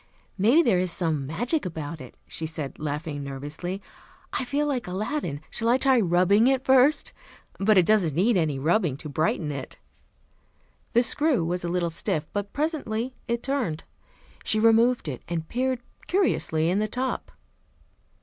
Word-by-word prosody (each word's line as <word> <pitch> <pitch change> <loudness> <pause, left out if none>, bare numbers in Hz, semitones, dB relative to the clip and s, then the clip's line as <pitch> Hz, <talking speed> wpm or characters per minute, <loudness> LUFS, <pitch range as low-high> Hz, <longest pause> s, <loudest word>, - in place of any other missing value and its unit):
"Maybe 235 - +5
there 205 - +3
is 180 -1 +1
some 155 -6 0
magic 240 - -1
about 160 -3 -5
it," 130 - -11
she 160 - -4
said, 155 -3 -6
laughing 150 -1 -4
nervously. 145 +8 -5 0.5
"I 260 - -1
feel 285 +4 0
like 265 -7 -2
Aladdin. 185 - -3
Shall 230 0 -1
I 245 - +5
try 265 -1 +4
rubbing 190 +4 +4
it 265 -1 +2
first? 265 +3 +4 0.5
But 210 +1 +4
it 180 - +6
doesn't 185 -8 +3
need 205 +7 +3
any 155 -6 +1
rubbing 160 0 +1
to 150 - -8
brighten 155 +1 0
it." 135 -2 -7 1.2
The 240 - +5
screw 280 - +1
was 175 +1 -2
a 170 - -2
little 175 -1 0
stiff, 155 -1 -2
but 205 0 -3
presently 265 -6 -2
it 235 -1 -1
turned. 250 - -1 0.6
She 215 - +1
removed 230 0 +4
it 130 -5 -4
and 165 -2 -3
peered 255 0 -1 0.3
curiously 240 - +1
in 190 - +1
the 215 - 0
top. 255 +4 -3
190 Hz, 160 wpm, -26 LUFS, 160-245 Hz, 1.2 s, it